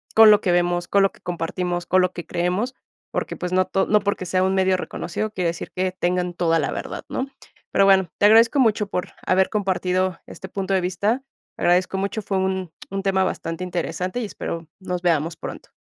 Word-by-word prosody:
con 220 Hz, -1 st, +9 dB
lo 210 Hz, -, +5 dB
que 185 Hz, -, +1 dB
vemos, 175 Hz, 0 st, +1 dB
con 200 Hz, -, +4 dB
lo 195 Hz, -, +3 dB
que -, -, -22 dB
compartimos, 175 Hz, +1 st, -3 dB
con 185 Hz, +1 st, +3 dB
lo 180 Hz, 0 st, +1 dB
que 175 Hz, -, -7 dB
creemos, 180 Hz, +10 st, -1 dB, 0.4 s
porque, -, -, -3 dB
pues, 180 Hz, -, -4 dB
no 185 Hz, 0 st, +3 dB
to 195 Hz, -, 0 dB
no 210 Hz, 0 st, +4 dB
porque 200 Hz, -2 st, -2 dB
sea 185 Hz, +1 st, +1 dB
un 190 Hz, 0 st, +2 dB
medio 190 Hz, 0 st, +3 dB
reconocido 210 Hz, +4 st, -4 dB
quiere 180 Hz, -4 st, -1 dB
decir 170 Hz, -, -6 dB
que 185 Hz, 0 st, 0 dB
tengan 180 Hz, -1 st, -1 dB
toda 165 Hz, -1 st, +2 dB
la -, -, -1 dB
verdad, -, -, -6 dB
¿no?, 260 Hz, -, -2 dB, 0.4 s
pero 195 Hz, -, +4 dB
bueno, 190 Hz, -3 st, +5 dB
te -, -, +3 dB
agradezco 225 Hz, +5 st, +6 dB
mucho 215 Hz, -4 st, +3 dB
por 180 Hz, -, -3 dB, 0.2 s
haber 190 Hz, +1 st, +3 dB
compartido 185 Hz, -3 st, 0 dB
este 190 Hz, -, -10 dB
punto 195 Hz, 0 st, -2 dB
de 190 Hz, -, +3 dB
vista. 200 Hz, +8 st, 0 dB, 0.3 s
Agradezco 180 Hz, +2 st, +2 dB
mucho, 200 Hz, +2 st, -2 dB
fue 195 Hz, -1 st, -1 dB
un 190 Hz, -2 st, -1 dB, 0.2 s
un 195 Hz, 0 st, -3 dB
tema 190 Hz, -1 st, +2 dB
bastante 165 Hz, -1 st, -3 dB
interesante 180 Hz, +3 st, -3 dB
y -, -, -2 dB
espero 170 Hz, -5 st, -5 dB
nos 180 Hz, -2 st, -4 dB
veamos 165 Hz, -1 st, +1 dB
pronto. -, -, -8 dB
185 Hz, 210 wpm, -23 LUFS, 175-195 Hz, 0.4 s, con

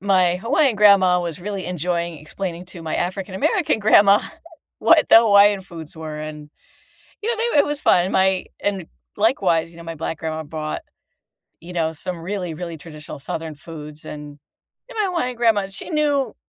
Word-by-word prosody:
my 185 Hz, -2 st, +3 dB
Hawaiian 260 Hz, -, +1 dB
grandma 195 Hz, -3 st, +5 dB
was 170 Hz, -1 st, -5 dB
really 200 Hz, 0 st, -5 dB
enjoying 175 Hz, -1 st, -2 dB
explaining 175 Hz, +3 st, -6 dB
to 180 Hz, -2 st, -10 dB
my 160 Hz, -, -3 dB
African-American 190 Hz, +3 st, -1 dB
grandma 205 Hz, -1 st, +6 dB, 0.6 s
what -, -, +4 dB
the -, -, +8 dB
Hawaiian 205 Hz, -2 st, +5 dB
foods 170 Hz, -4 st, -11 dB
were, 155 Hz, -1 st, -6 dB
and, 150 Hz, -1 st, -8 dB, 0.7 s
you 440 Hz, -, -2 dB
know, 475 Hz, -, -1 dB
they 460 Hz, +2 st, 0 dB
w 290 Hz, -, +4 dB
it -, -, -5 dB
was 295 Hz, 0 st, -3 dB
fun, 175 Hz, -, +4 dB
and 185 Hz, -, -3 dB
my 190 Hz, -1 st, +2 dB, 0.2 s
and 195 Hz, -4 st, -2 dB, 0.3 s
likewise, 190 Hz, -7 st, +1 dB
you 170 Hz, -, -17 dB
know, 170 Hz, -, -10 dB
my 165 Hz, 0 st, -6 dB
black 160 Hz, 0 st, -4 dB
grandma 160 Hz, 0 st, -4 dB
brought, 155 Hz, 0 st, -5 dB, 0.8 s
you 175 Hz, +2 st, -10 dB
know, 165 Hz, -2 st, 0 dB
some 175 Hz, +3 st, -5 dB
really, 180 Hz, -1 st, -4 dB
really 170 Hz, 0 st, -6 dB
traditional 155 Hz, -1 st, -10 dB
southern 160 Hz, +3 st, -5 dB
foods, 150 Hz, 0 st, -11 dB
and 150 Hz, -1 st, -9 dB, 0.5 s
and -, -, -12 dB
my 425 Hz, -, +2 dB
Hawaiian 335 Hz, -10 st, -2 dB
grandma, 225 Hz, -4 st, +2 dB
she 195 Hz, -, -1 dB
knew 295 Hz, -3 st, +1 dB
180 Hz, 180 wpm, -21 LUFS, 160-205 Hz, 0.8 s, the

